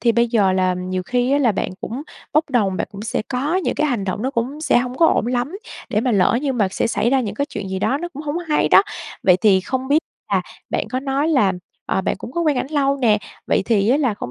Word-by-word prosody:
thì 235 -1 +3
bây 235 0 +2
giờ 205 -5 +3
là 185 -1 +2
nhiều 185 0 -3
khi 245 +6 0
á 285 - +4
là 250 -6 +3
bạn - - -2
cũng 245 +6 -5 0.3
bốc 310 -1 +2
đồng, 205 -7 +1
bạn - - -2
cũng 200 - -8
sẽ 220 - -2
có 280 +8 -1
những 375 - 0
cái 300 - +1
hành 235 -8 -1
động 195 +3 -3
nó 265 - 0
cũng 265 +5 -3
sẽ 310 - +3
hông 250 +1 -3
có 330 - +6
ổn 225 - +2
lắm 250 +8 -1 0.3
để 215 - +1
mà 250 +2 0
lỡ 200 +4 +3
như 275 - 0
mà 210 -6 +1
sẽ - - 0
xảy 230 +1 0
ra 270 - +3
những 210 -5 -3
cái 280 - -1
chuyện 205 -9 -6
gì 190 0 -3
đó 270 +8 0
nó 345 - -4
cũng 295 -2 -9
hổng 300 +2 -2
hay 300 - +2
đó. - - +7 0.4
Vậy 180 -2 +5
thì 195 -3 +5
không 260 +6 -3
biết 290 +2 +5 0.3
là - - +2 0.3
bạn - - -1
có 255 - -2
nói 275 +3 0
là, 255 -11 +3 0.3
ờ, - - 0
bạn - - -1
cũng 240 - -8
có 340 - -1
quen 305 -5 +2
ảnh 255 - -1
lâu 280 -2 +1
nè, 225 -6 +3 0.3
vậy - - +2
thì 210 -2 +2
á 270 - +4
là 260 -7 +1
hông 120 - -5
245 Hz, 280 wpm, -20 LUFS, 205-280 Hz, 0.4 s, đó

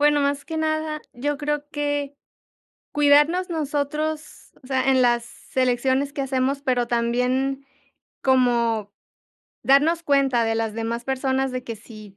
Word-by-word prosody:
Bueno, 295 0 +4
más 280 0 -1
que 320 - -4
nada, 310 -1 -1
yo 285 +4 -2
creo 295 0 -3
que 290 -1 -2 0.8
cuidarnos 295 +5 +4
nosotros, 300 0 -3
o 255 - -15
sea, 265 0 +2
en 260 - +4
las 240 0 -1
elecciones 260 +2 +1
que 285 - -4
hacemos, 270 +1 0
pero 250 -3 0
también 250 +3 0 0.6
como 235 -5 +2 0.7
darnos 305 +5 +4
cuenta 275 -5 +2
de 225 0 0
las 225 -1 -1
demás 230 +2 -3
personas 265 0 0
de 255 0 -3
que 230 -3 -6
si 215 -2 -13
270 Hz, 140 wpm, -23 LUFS, 245-290 Hz, 0.8 s, Bueno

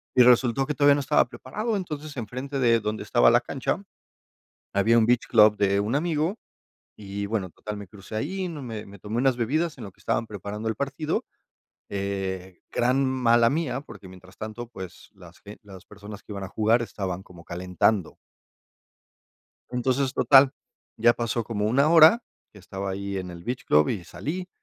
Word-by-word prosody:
Y 125 - +7
resultó 125 +1 +4
que 150 - -2
todavía 145 0 +5
no - - -1
estaba 145 +2 +3
preparado, 210 - -4
entonces, 155 -5 -6
enfrente 130 +4 -4
de 115 -2 +4
donde 105 0 -3
estaba 120 +3 +4
la 120 - +5
cancha. 135 +9 -3 0.9
Había 110 +4 +3
un 115 - +5
beach 120 +1 +2
club 105 -2 +6
de 100 -1 +2
un 105 +5 -1
amigo 165 +5 0 0.6
y, 100 -1 -5
bueno, 100 -3 -2
total 105 +4 -7
me 100 -2 -9
crucé 105 +1 -11
ahí, 185 - -2
no, 155 -4 -7
me 115 -4 -6
me 100 0 -13
tomé 105 +4 -5
unas 130 0 +2
bebidas 150 +7 -1
en 125 - -9
lo 100 - -9
que - - -32
estaban 115 +1 -1
preparando 105 +1 -6
el 110 - -1
partido. 140 +3 -2 0.7
Eh, 95 -2 -4
gran 125 +3 +2
mala 120 -3 +3
mía, 150 -2 -1
porque 105 -8 -12
mientras 95 0 -15
tanto, 110 +2 -6
pues, 95 -6 -10
las 90 -2 -16
b 105 +1 -11
las 95 -3 -13
personas 105 0 -11
que 105 - -10
iban 100 - -5
a 95 - -6
jugar 110 +3 +2
estaban 95 -5 -4
como 90 -3 -15
calentando. 90 +2 0 1.6
Entonces, 130 +2 0
total, 135 -1 +6 0.5
ya 120 +1 +5
pasó 115 0 -2
como 105 -2 -2
1 140 +7 +3
hora 170 +8 +7 0.3
que 105 - -15
estaba 95 +1 -6
ahí 100 +1 -4
en 90 -1 -5
el 85 0 -10
beach 125 +4 -4
club 75 0 +4
y 95 -5 -3
salí, 150 - -5
115 Hz, 185 wpm, -25 LUFS, 100-135 Hz, 1.6 s, Y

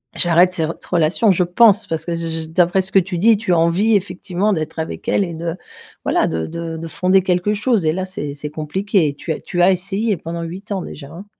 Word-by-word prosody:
j'arrête 175 +1 +4
cette 165 -2 -2
relation». 175 +6 +2
Je 180 0 +2
pense 205 +3 +4
parce 160 -1 -3
que, 170 - -2
j 165 -1 -3
j 160 - -10
d'après 175 +3 +2
ce 190 +1 -3
que 195 - +5
tu 185 0 -3
dis, 220 +3 +5
tu 210 -3 -2
as - - +3
envie 185 +7 +3
effectivement 190 +1 -1
d'être 160 -2 -4
avec 160 - -5
elle 200 - +2
et 170 - -6
de, 165 0 -4 0.5
voilà, - - +2
de 80 0 -2
de 165 -1 -5
de 165 +1 -6
fonder 185 +3 +2
quelque 180 +3 +1
chose 215 -4 +1
et 155 - +2
là, 185 +2 -3
c'est 150 -6 -5
c'est 150 +1 -6
compliqué. 155 +1 0
Tu 160 - -5
as - - -7
tu 175 - -2
as 185 - +6
essayé 195 +3 -1
pendant 170 +1 -6
8 185 +5 -8
ans 195 -2 -1
déjà, 140 -2 -9
hein. 185 +5 -10
175 Hz, 235 wpm, -19 LUFS, 165-195 Hz, 0.5 s, as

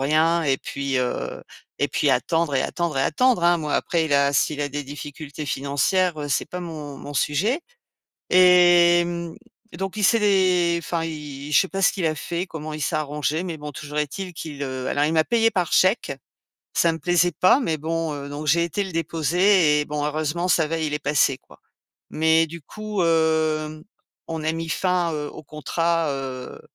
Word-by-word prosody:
rien 160 +4 +2
et 135 -3 +2
puis, 140 -1 -3
heu, 125 -1 -3 0.4
et 145 - +2
puis 140 +1 +1
attendre 145 +4 +1
et 130 - +2
attendre 170 -6 -2
et - - +2
attendre, 180 - +2
hein, 175 0 +4
moi, 150 -2 -2
après 165 -2 0
il 145 - -2
a 140 0 +3
s'il 145 +2 +1
a 145 - -1
des 145 +1 -4
difficultés 145 +1 -8
financières, 155 +6 0
heu, 145 - -4
c'est 140 - 0
pas 180 - -5
mon 155 -5 -7
mon 145 - -9
sujet. 195 - +1 0.7
Et 175 -1 +6
mmh, 170 -1 -5 0.4
donc 195 +2 -4
il 210 - -1
s'est 230 +3 +4
dé 185 -4 +3
enfin, 165 +1 -2
il 150 -2 -7
je - - +7
sais 190 - -3
pas 195 - -3
ce 195 - +5
qu'il 185 -4 -2
a 155 -1 0
fait, 170 +4 -3
comment 155 -4 -7
il 155 - -6
s'est 150 +4 -1
arrangé 150 +2 -2
mais 175 -3 -4
bon, 150 0 -7
toujours 150 +1 -7
est-il 175 +5 -4
qu'il, 150 -3 -7
heu 130 -1 -4
alors 145 +1 +1
il 155 - 0
m'a 160 -1 +4
payée 225 +3 +2
par 180 -4 -1
chèque, 185 - +3 0.6
ça 170 - +3
ne - - -2
me - - -9
plaisait 175 0 +2
pas 185 - +4
mais 165 - -1
bon, 165 +1 -2
heu, 140 -1 -6
donc 145 +2 -6
j'ai 170 +4 +3
été 170 +5 -2
le 190 - -5
déposer 165 0 +2
et - - -2
bon 150 0 -3
heureusement, 155 +4 -1
ça 165 -3 +3
va, 165 +2 -2
il 155 -2 -2
est 150 - -1
passé, 140 -3 +2
quoi. - - -20 0.5
Mais 160 +1 +3
du 170 +2 -9
coup, 215 +3 -4
hem, 160 -1 +1 0.5
on 160 -1 -4
a 160 - +1
mis 165 0 -4
fin, 180 -1 0
heu, 150 -1 -4
au - - -11
contrat, 165 +2 -1
heu 130 -2 -6
160 Hz, 205 wpm, -23 LUFS, 145-175 Hz, 0.7 s, je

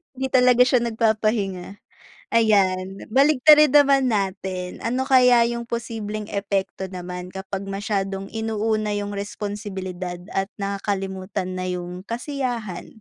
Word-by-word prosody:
Hindi 265 0 -3
talaga 250 -1 +6
siya 250 -1 +3
nag-papahinga. 215 -5 0 0.6
Ayan, 195 -4 +1
baliktarin 295 +2 +6
naman 275 -2 +5
natin, 190 -4 -2
ano 250 +3 0
kaya 250 -3 +5
yung 235 0 -4
posibleng 220 -3 -5
epekto 195 -1 -2
naman 180 -1 -7
kapag 190 +1 -5
masyadong 195 -1 -3
inuuna 220 -1 -1
yung 205 0 -3
responsibilidad 195 -3 -5
at 195 0 -1
nakakalimutan 195 -2 -3
na 185 - -3
yung 180 +1 -5
kasiyahan? 240 - -4
205 Hz, 110 wpm, -23 LUFS, 190-235 Hz, 0.6 s, talaga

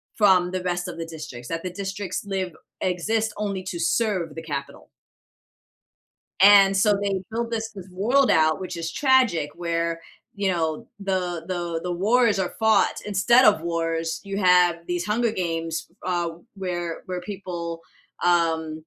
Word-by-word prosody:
from 185 -4 +4
the 185 - -2
rest 175 0 -2
of 170 - -7
the 165 - -4
districts, 155 -7 -8
that 165 0 -3
the 185 - -3
districts 195 0 -4
live 190 -4 -3 0.3
exist 215 +5 0
only 200 -3 -3
to 180 -2 -5
serve 180 -4 0
the 165 - -7
capital. 140 -3 -6 1.5
And 195 -1 +7
so, 205 0 +3
they 195 -2 -1
built 230 +1 -2
this 225 -1 -3
this 190 -3 -10
world 245 +9 +2
out- 155 +2 +3
which 185 -1 -5
is 165 0 -4
tragic- 250 - +3
where, 170 -1 -2 0.3
you 200 -1 0
know, 160 -3 -2
the 180 -4 -2
the 175 -2 -3
the 180 0 -2
wars 215 +3 +3
are 190 -2 -2
fought 220 0 +3
instead 210 +6 +4
of 205 -8 +5
wars, 165 -1 -2
you 195 0 -4
have 180 -3 +4
these 175 -1 -2
Hunger 230 +1 +1
Games, 165 -4 -3 0.2
uh, 175 -2 0 0.3
where 175 -3 -4
where 180 -1 -4
people, 175 -4 -6 0.4
um 160 -2 +1
180 Hz, 155 wpm, -24 LUFS, 165-200 Hz, 1.5 s, And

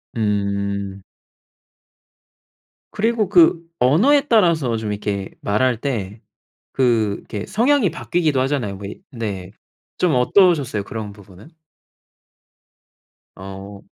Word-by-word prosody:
음. 100 -2 -2 1.9
그리고 220 0 +1
그 175 -3 +5 0.2
언어에 245 - +4
따라서 165 - +3
좀 110 -1 -3
이렇게 100 -1 -3
말할 115 +3 +1
때 110 -6 -4 0.6
그 115 -6 +2
이렇게 105 -1 -7
성향이 240 - +2
바뀌기도 160 -5 0
하잖아요. 130 -8 -1
왜 100 +1 -6 0.2
네. 100 -6 -5 0.5
좀 175 -5 +2
어떠셨어요 140 - +3
그런 105 0 -6
부분은? 100 - -16 1.8
어. 95 +1 -9
115 Hz, 200 characters per minute, -20 LUFS, 100-165 Hz, 1.9 s, 그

